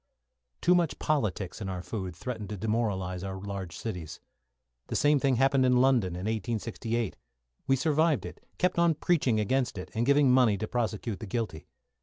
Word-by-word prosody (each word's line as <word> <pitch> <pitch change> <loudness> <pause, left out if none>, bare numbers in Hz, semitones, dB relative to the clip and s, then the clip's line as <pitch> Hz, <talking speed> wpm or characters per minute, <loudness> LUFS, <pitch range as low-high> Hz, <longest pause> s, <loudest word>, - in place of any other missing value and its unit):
Too 175 - +5
much 175 -5 +1
politics 110 - -1
in 95 - -3
our 90 -1 -4
food 95 -5 -5
threatened 110 +1 -5
to 105 - -4
demoralise 95 -4 -1
our 95 -1 -5
large 95 -3 -6
cities. 90 -9 -6 0.7
The - - -4
same 145 0 +4
thing 135 -1 +2
had 125 - +2
happened 135 -1 +4
in 125 -1 +4
London, 125 -9 +3
in 90 - -5
1868. 110 +1 -2 0.5
We 135 - +4
survived 155 +2 +2
it, - - -9
kept 180 -1 +1
on 170 -2 +4
preaching 145 -8 +2
against 125 +2 0
it, 90 - -7
and 115 - 0
giving 140 0 +4
money 125 -5 +4
to 110 - -3
prosecute 115 -3 -2
the 110 - -7
guilty. 95 -8 -3
115 Hz, 180 wpm, -29 LUFS, 100-135 Hz, 0.7 s, Too